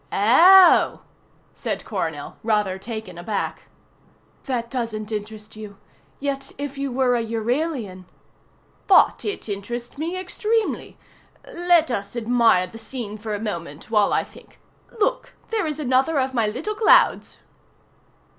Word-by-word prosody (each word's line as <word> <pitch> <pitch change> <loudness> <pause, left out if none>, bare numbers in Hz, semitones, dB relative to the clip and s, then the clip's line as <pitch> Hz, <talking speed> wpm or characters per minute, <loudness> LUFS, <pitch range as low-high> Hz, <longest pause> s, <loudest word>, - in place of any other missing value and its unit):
"Oh!" 345 - +6 0.5
said - - -4
Coronel, - - -4
rather 210 -4 0
taken 215 -4 -7
aback. 200 +3 -4 0.8
"That 235 -3 -3
doesn't 225 -4 -4
interest 215 0 -6
you. 210 -2 -10 0.4
Yet 275 -1 -3
if 285 -1 -5
you 275 -1 -3
were 250 0 +2
a 235 - 0
Euralian 230 - -3 0.4
" - - -36
"But - - +3
it 410 - -4
interests 235 +6 -6
me 335 +4 -3
extremely. 425 +4 -2 0.5
Let 345 -4 +2
us 200 -1 -4
admire 235 -5 +3
the 205 +5 -12
scene 225 -2 -6
for 215 0 -4
a - - -5
moment, 170 -6 -6
while 210 -2 +3
I - - +2
think. - - -18 0.4
Look, - - -1 0.2
there 430 -7 0
is 305 0 -4
another 265 +2 +1
of 260 0 -1
my 230 -4 +1
little 320 - -3
clouds." 430 +1 +3
235 Hz, 135 wpm, -22 LUFS, 210-285 Hz, 0.8 s, Oh